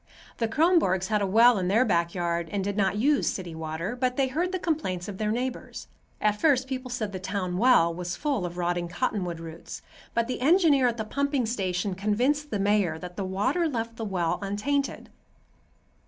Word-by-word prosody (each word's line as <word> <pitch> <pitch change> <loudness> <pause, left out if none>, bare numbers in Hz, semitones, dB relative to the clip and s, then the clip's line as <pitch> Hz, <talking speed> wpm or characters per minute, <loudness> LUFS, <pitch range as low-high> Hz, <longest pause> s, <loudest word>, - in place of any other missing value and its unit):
The 230 - +1
Kronborgs 225 - +2
had 210 -1 +1
a 200 - +1
well 230 +3 +5
in 180 - -1
their 220 +7 +3
back 170 -5 +1
yard 170 -1 -1
and 200 -2 -1
did 200 0 -2
not 200 -1 +1
use 280 +6 +2
city 175 -3 -6
water, 160 +6 -4
but 250 0 -1
they 270 -2 +2
heard 345 +7 -1
the 375 - -1
complaints 300 - -2
of 200 -2 -7
their 215 -1 0
neighbors. 250 +3 -4 0.3
At 210 0 0
first 265 -5 +3
people 255 -1 -4
said 240 -4 -2
that 185 -2 -6
the - - -5
town 185 -3 -2
well 210 -9 +5
was 175 +1 -4
full 280 -9 -1
of 175 0 -5
rotting 175 0 -1
cottonwood 180 -3 -2
roots, 165 0 -9 0.3
but 230 0 +1
the 250 - -4
engineer 300 -3 +4
at 235 -1 -1
the 220 - -3
pumping 280 +1 0
station 195 -3 -1
convinced 245 +10 0
the 210 - -1
mayor 200 -5 +1
that 180 +2 -9
the 195 - -3
water 255 - 0
left 230 -3 -4
the 225 - -4
well 180 -5 -1
untainted. 235 +9 -2
210 Hz, 200 wpm, -27 LUFS, 180-255 Hz, 0.3 s, well